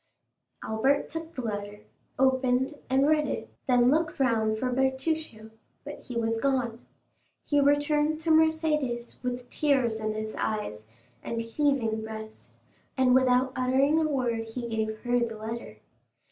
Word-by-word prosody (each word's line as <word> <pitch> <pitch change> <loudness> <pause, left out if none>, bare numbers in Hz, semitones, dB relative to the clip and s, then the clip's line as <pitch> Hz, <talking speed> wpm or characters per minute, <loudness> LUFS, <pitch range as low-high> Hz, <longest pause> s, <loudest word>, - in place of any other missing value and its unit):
Albert 265 +6 +1
took 325 0 -7
the 255 - -4
letter, 205 -1 -5 0.4
opened, 260 +1 +2 0.2
and 270 +2 +3
read 305 -1 +3
it, - - -5
then 245 -1 +4
looked 315 0 0
round 220 -4 +2
for 250 +2 -1
Bertuccio, 265 -3 -1 0.3
but - - -8
he 245 - -9
was 225 0 0
gone. 250 -4 0 0.6
He 290 - +2
returned 295 +2 +2
to 325 - 0
Mercédès 310 -6 +1
with 250 0 -3
tears 260 -7 +1
in 215 0 -2
his 215 0 -4
eyes 110 - -3 0.3
and 230 - -4
heaving 230 -2 0
breast, 220 0 -9 0.4
and 255 -1 +4
without 255 0 +4
uttering 265 +4 +3
a 315 -1 +1
word 240 -5 -1
he 235 +1 -5
gave 220 -1 -2
her 245 0 +1
the 230 -2 -2
letter. 220 - -6
250 Hz, 145 wpm, -28 LUFS, 225-280 Hz, 0.6 s, then